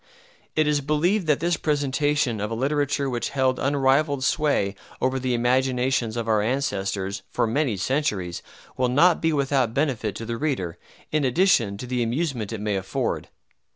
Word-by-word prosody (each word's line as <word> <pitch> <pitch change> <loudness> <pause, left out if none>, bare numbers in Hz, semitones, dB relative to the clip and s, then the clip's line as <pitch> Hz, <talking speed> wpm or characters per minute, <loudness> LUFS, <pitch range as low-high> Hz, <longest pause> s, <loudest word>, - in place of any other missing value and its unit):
It 155 - +3
is 150 -1 +1
believed 165 +7 +1
that 150 -2 +2
this 170 -1 +1
presentation 145 -5 0
of 105 - -2
a 115 - -3
literature 140 +2 0
which 120 -2 -2
held 130 -1 +2
unrivalled 140 0 +2
sway 140 -10 +1 0.3
over 130 +1 0
the 125 -1 0
imaginations 125 -1 +1
of 115 -1 -2
our 110 -2 +3
ancestors, 100 -5 -2
for - - 0
many 120 -1 0
centuries, 100 - -1 0.3
will 125 -1 +1
not 165 +7 +4
be 160 - +2
without 135 -5 +1
benefit 130 -8 0
to 115 - -6
the 115 0 -3
reader, 115 - -2 0.3
in 155 -1 +1
addition 125 - +3
to 125 - -6
the 125 0 -1
amusement 120 -2 -1
it 110 -2 -5
may 105 -2 0
afford. 95 0 -2
130 Hz, 165 wpm, -24 LUFS, 115-145 Hz, 0.3 s, not